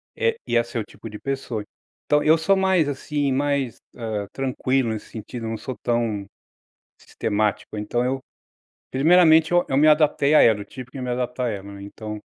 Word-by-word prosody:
eh, 465 Hz, -1 st, +1 dB
ia 120 Hz, -, +3 dB
ser 120 Hz, 0 st, -5 dB
o -, -, -2 dB
tipo 115 Hz, -, -11 dB
de 105 Hz, 0 st, -9 dB
pessoa. 135 Hz, -5 st, -3 dB, 0.4 s
Então 150 Hz, 0 st, +3 dB
eu 160 Hz, +2 st, +5 dB
sou 165 Hz, +5 st, +3 dB
mais, 190 Hz, -5 st, +2 dB
assim, 145 Hz, 0 st, -2 dB
mais, 140 Hz, -3 st, 0 dB, 0.2 s
hã, 110 Hz, -4 st, -4 dB
tranquilo 130 Hz, -1 st, 0 dB
nesse 110 Hz, -1 st, -5 dB
sentido, 115 Hz, +1 st, -6 dB
não 110 Hz, 0 st, -3 dB
sou 130 Hz, +3 st, -6 dB
tão, 115 Hz, -4 st, 0 dB, 0.8 s
sistemático. 105 Hz, 0 st, -2 dB
Então 110 Hz, +4 st, -1 dB
eu 135 Hz, +1 st, -1 dB, 0.7 s
primeiramente, 160 Hz, +3 st, +5 dB
eu 175 Hz, 0 st, +4 dB
eu 135 Hz, -, 0 dB
me 150 Hz, +3 st, +5 dB
adaptei 150 Hz, -1 st, +4 dB
à -, -, +8 dB
ela, 110 Hz, -3 st, +4 dB
eu -, -, -6 dB
tive 125 Hz, +4 st, -10 dB
que 135 Hz, -, -8 dB
me 125 Hz, -1 st, -3 dB
adaptar 125 Hz, 0 st, -2 dB
à -, -, 0 dB
ela, 100 Hz, -1 st, -6 dB
né, 100 Hz, 0 st, -10 dB
então 105 Hz, +1 st, -7 dB
125 Hz, 190 wpm, -23 LUFS, 110-145 Hz, 0.8 s, à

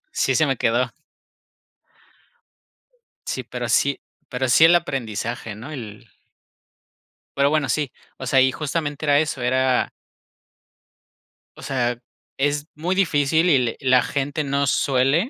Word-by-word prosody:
sí -, -, +1 dB
se -, -, +3 dB
me -, -, 0 dB
quedó. -, -, +1 dB, 2.4 s
Sí, -, -, -3 dB
pero -, -, -5 dB
sí 140 Hz, -1 st, +2 dB, 0.3 s
pero 130 Hz, 0 st, -2 dB
sí 160 Hz, +6 st, +7 dB
el 170 Hz, +2 st, +6 dB
aprendizaje, 120 Hz, -8 st, -3 dB
¿no?, 120 Hz, +8 st, -9 dB
el 110 Hz, -8 st, -9 dB, 1.3 s
Pero 140 Hz, +1 st, +3 dB
bueno, 155 Hz, -4 st, +1 dB
sí, 145 Hz, +1 st, -1 dB, 0.3 s
o 130 Hz, -, -7 dB
sea, 130 Hz, +1 st, +4 dB
y 130 Hz, 0 st, +4 dB
justamente 150 Hz, +1 st, -3 dB
era 145 Hz, -1 st, +4 dB
eso, 150 Hz, -5 st, -2 dB
era 130 Hz, 0 st, +1 dB, 1.7 s
O -, -, -11 dB
sea, 125 Hz, -3 st, -1 dB, 0.4 s
es 145 Hz, +2 st, 0 dB
muy 170 Hz, +5 st, -1 dB
difícil 160 Hz, -2 st, +2 dB
y 145 Hz, -, +5 dB
le 120 Hz, -3 st, -1 dB
la 130 Hz, -1 st, +3 dB
gente 145 Hz, +2 st, -2 dB
no 140 Hz, 0 st, 0 dB
suele 135 Hz, -, +2 dB
140 Hz, 135 wpm, -22 LUFS, 125-150 Hz, 2.4 s, sí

